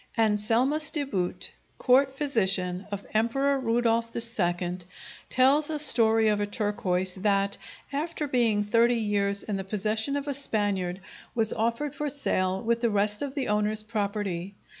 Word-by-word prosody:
Anselmus 230 +8 +2
de 295 - 0
Boot, 190 -10 -2 0.3
court 265 +1 +3
physician 195 -10 0
of 200 0 -5
Emperor 270 +6 +1
Rudolph 230 -1 +1
II, 180 -6 -2 0.5
tells 275 +4 +3
a 310 - -1
story 225 -6 +5
of 210 -1 +1
a 205 - -1
turquoise 190 -4 -1
that, 200 -1 0 0.3
after 305 +1 -2
being 230 -6 +2
thirty 230 +3 +3
years 200 -2 0
in 205 -2 -3
the 195 - -4
possession 215 +6 -1
of 285 0 -3
a 285 - -1
Spaniard, 200 -8 -1 0.3
was 225 -2 +3
offered 235 +6 -1
for 295 0 -3
sale 190 -9 -1
with 235 0 0
the 235 - +2
rest 210 0 0
of 280 -1 -4
the 275 -3 -2
owner's 210 +1 0
property. 200 -4 -3
220 Hz, 150 wpm, -27 LUFS, 200-260 Hz, 0.5 s, story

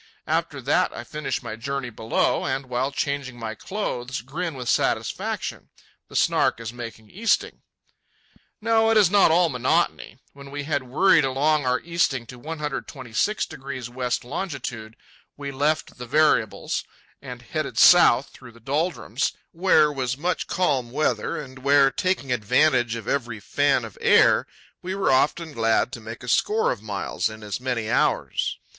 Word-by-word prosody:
After - - -1
that - - +2
I 120 - -7
finish 145 +1 -4
my 115 -2 -5
journey 135 +2 -4
below, 110 0 0
and 135 -1 -2
while 130 +2 -1
changing 140 -3 -3
my 115 -2 -5
clothes 130 - -4
grin 160 +6 -4
with 125 -2 -6
satisfaction—the - - -3
Snark - - +2
is 115 0 -6
making 115 -3 -9
easting. 220 +3 0 1.0
No, 225 0 +3
it 225 - +4
is 195 -4 +5
not 200 -4 +6
all 170 +2 +4
monotony. 125 -4 0 0.2
When 140 0 -12
we 145 +1 -5
had 145 -1 -1
worried 150 +6 +4
along 140 +2 +1
our 125 0 +2
easting 165 -7 0
to 125 +1 -11
126° 140 - -3
west 125 0 -2
longitude, 125 - -5 0.4
we 140 -1 -5
left 145 0 -1
the 125 - -7
variables 120 -8 +1 0.4
and - - -9
headed - - -4
south - - +6
through 120 - -14
the 115 - -17
doldrums, 150 +9 -1 0.2
where 160 -4 +3
was 130 -1 -2
much 175 +5 -1
calm 135 -10 0
weather 150 +5 -1
and 130 -2 -9
where, 140 0 +4
taking 165 -1 -1
advantage 120 +1 +2
of 115 -2 -7
every 120 -6 -2
fan 140 +3 +1
of 110 - -12
air, - - +5 0.3
we 185 +1 -4
were 195 -6 +1
often 150 +4 +1
glad 115 0 +1
to 120 - -7
make 115 +3 -9
a - - -9
score 215 - +2
of 115 - -5
miles 100 -3 -2
in 110 0 -10
as 105 +2 -4
many 125 -4 -2
hours. - - 0
135 Hz, 155 wpm, -24 LUFS, 120-155 Hz, 1.0 s, not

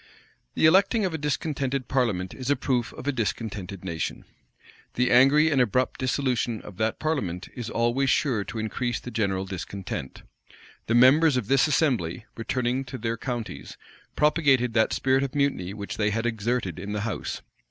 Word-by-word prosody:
The - - +3
electing 195 +6 +4
of 180 - -2
a - - -1
discontented 140 -3 -2
parliament 105 -9 0
is 130 0 -5
a 145 - +4
proof 125 -4 -1
of - - -9
a 145 - +2
discontented 105 -6 -4
nation: 85 -3 -4 0.7
the 125 0 +2
angry 140 +6 +6
and 135 -3 +3
abrupt 125 +2 +1
dissolution 125 -2 0
of 95 - -11
that 110 +1 0
parliament 105 - -2
is 120 -3 -5
always 120 +4 +1
sure 125 -9 +1
to - - -7
increase 120 +3 -2
the 125 - -8
general 95 -4 -1
discontent. 95 -6 -6 0.6
The 115 - +2
members 135 +4 +6
of 115 -5 -3
this 135 +2 +4
assembly, 120 - 0
returning 125 +3 -1
to 130 +1 -7
their 115 0 -2
counties, 120 -1 -6 0.4
propagated 140 -6 +3
that 110 -1 +3
spirit 130 0 +2
of 140 +1 -3
mutiny 140 -11 0
which 100 -1 -6
they 105 -1 +2
had 115 +3 -2
exerted 115 -5 -1
in 100 +2 -5
the 105 - -2
house. 110 +1 -4
120 Hz, 170 wpm, -26 LUFS, 105-135 Hz, 0.7 s, angry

